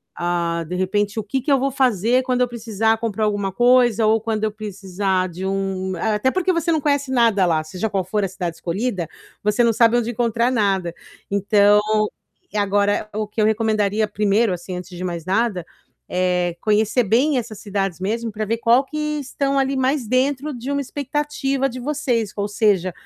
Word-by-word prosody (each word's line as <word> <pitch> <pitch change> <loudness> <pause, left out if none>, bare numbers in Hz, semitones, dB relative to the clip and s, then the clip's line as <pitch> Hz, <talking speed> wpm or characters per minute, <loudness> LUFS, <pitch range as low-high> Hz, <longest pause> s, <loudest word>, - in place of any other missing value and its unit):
ah, 170 -1 -1
de 180 - -4
repente, 205 +3 0
o - - -3
que 260 +6 -2
que 285 - -1
eu 270 - +4
vou 275 +1 0
fazer 250 -1 +2
quando 250 -1 0
eu 250 - +3
precisar 225 -1 0
comprar 220 -1 -1
alguma 205 -2 -1
coisa 240 0 +4
ou 220 +1 +4
quando 220 -1 -2
eu 215 - -1
precisar 195 -3 -2
de 180 +3 -6
um 190 -1 -2
eh, 220 +2 0
até 235 +5 +1
porque 370 0 +1
você 335 0 0
não 315 - +2
conhece 285 -2 0
nada 230 -6 +3
lá, 160 -2 +1
seja 185 +7 -4
qual 195 -2 -1
for 205 +3 -1
a - - +1
cidade 180 -3 -4
escolhida, 185 -1 -2 0.4
você 210 +3 +2
não 230 -1 +3
sabe 230 +1 +4
onde 240 0 -1
encontrar 235 +1 +1
nada. 195 -7 0 0.4
Então 205 +1 +4 0.7
e 210 - -4
agora 205 +1 +1
o 215 0 -2
que 215 +1 -3
eu - - +4
recomendaria 215 -1 +1
1º, 210 +1 +2
assim, 180 +1 -6
antes 180 +1 -7
de 180 - -5
mais 170 -3 -4
nada, 195 -1 0 0.5
eh, 180 -1 0
conhecer 215 +3 +2
bem 255 +7 +2
essas 225 -4 -5
cidades 195 -4 -3
mesmo 225 +4 -2
pra 215 +1 -4
ver 225 +2 -1
qual 235 +3 +4
que 305 +3 -8 0.2
estão 275 0 -1
ali 270 0 0
mais 260 -2 0
dentro 270 +4 0
de 260 +4 -5
uma 280 0 0
expectativa 275 0 -2
de 250 +1 -7
vocês, 245 -6 -1
ou 205 0 -1
seja, 205 -4 +1
215 Hz, 195 wpm, -21 LUFS, 195-245 Hz, 0.7 s, eu